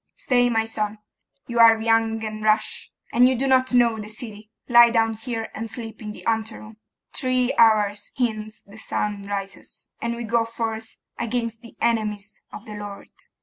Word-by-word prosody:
'Stay, 250 - +2
my 225 -1 +1
son; 215 -1 -2 0.5
you 235 -1 -3
are 225 -1 +8
young 225 0 +1
and 215 0 -5
rash, 215 0 0 0.2
and 245 +1 +6
do 270 - 0
not 260 -1 +3
know 235 -3 +3
the 210 0 -7
city. 215 -1 -6 0.2
Lie 240 -1 +8
down 225 -1 +2
here 225 0 -5
and 225 +1 -5
sleep 225 -1 -7
in 210 -1 -5
the - - -12
anteroom. 220 -1 -3 0.4
Three 255 -1 +1
hours 210 -2 +3
hence 215 -3 -2
the 205 +2 -15
sun 210 -2 -2
rises, 200 -1 -6
and 235 0 -2
we 235 - -5
go 230 0 +1
forth 225 -1 -5 0.2
against 230 -1 -2
the 235 - -14
enemies 210 -3 -1
of 210 - -10
the 215 - -8
Lord. 205 -1 -8
225 Hz, 170 wpm, -23 LUFS, 215-235 Hz, 0.5 s, are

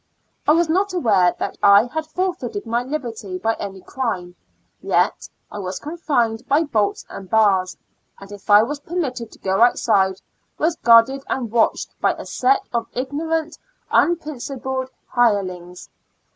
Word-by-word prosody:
I 300 - +6
was 335 +1 +3
not 380 +4 +1
aware 200 - +3
that - - -4
I 200 +1 +7
had 315 +5 -4
forfeited 315 - -3
my 230 +1 0
liberty 240 -8 -5
by 225 +5 0
any 195 -2 -6
crime, 185 -10 -4 0.5
yet - - 0 0.2
I 210 - -6
was 185 -1 -4
confined 275 -8 -1
by 290 +4 +3
bolts 215 -9 -1
and 195 -2 -10
bars, 195 -4 +2 0.4
and 195 0 -12
if 205 +1 -12
I 205 +1 +7
was 285 +5 -4
permitted 275 -8 -4
to - - -15
go 190 +2 -1
outside, 195 -5 +3 0.4
was 325 +1 +1
guarded 235 +4 +5
and 240 -5 -2
watched 230 -1 +1
by - - +3
a - - -9
set 260 +2 +1
of 235 -1 -1
ignorant, 310 +5 -3 0.3
unprin 310 -5 +1
cipled 265 -1 -4 0.2
hirelings. 185 -7 0
235 Hz, 150 wpm, -21 LUFS, 200-295 Hz, 0.5 s, I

